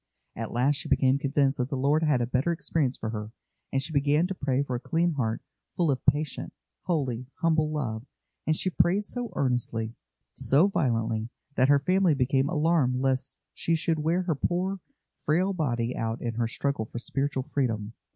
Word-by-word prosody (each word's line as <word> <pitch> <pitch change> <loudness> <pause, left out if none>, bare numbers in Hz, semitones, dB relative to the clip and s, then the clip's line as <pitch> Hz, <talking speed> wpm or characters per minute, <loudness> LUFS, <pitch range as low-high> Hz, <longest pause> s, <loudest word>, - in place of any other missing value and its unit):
At 115 -1 -4
last 135 +4 +2
she 150 - -4
became 135 -1 +3
convinced 140 -1 +1
that 125 +1 0
the 140 - -2
Lord 145 +4 +2
had 150 -6 +2
a - - +2
better 130 +7 +1
experience 160 -5 0
for 110 - -4
her, 105 -1 -5 0.4
and 135 - +1
she 155 - -3
began 145 +3 +3
to 190 - -2
pray 135 -5 0
for 130 -3 -3
a - - -2
clean 170 +6 +1
heart 115 -6 -2 0.3
full 170 -4 +2
of 130 - -2
patient, 145 +1 +1 0.3
holy, 130 -8 -1
humble 160 -3 +2
love; 120 -8 -3 0.4
and 155 - +3
she 185 - 0
prayed 195 +4 +2
so 245 +1 -4
earnestly, 120 -4 -1 0.4
so 150 +8 +4
violently, 115 - 0 0.2
that 130 0 +3
her 145 - +7
family 180 +3 +3
became 135 +1 +2
alarmed 155 -5 +2
lest 130 0 0 0.2
she 165 - 0
should 160 0 0
wear 165 +4 +1
her 175 -3 0
poor, 180 +6 -1 0.4
frail 180 +6 +2
body 125 -8 -1
out 115 +1 -2
in 120 -1 -3
her 115 0 0
struggle 140 0 -1
for 115 - -8
spiritual 135 +2 -2
freedom. 115 -6 -2
140 Hz, 185 wpm, -27 LUFS, 125-160 Hz, 0.4 s, her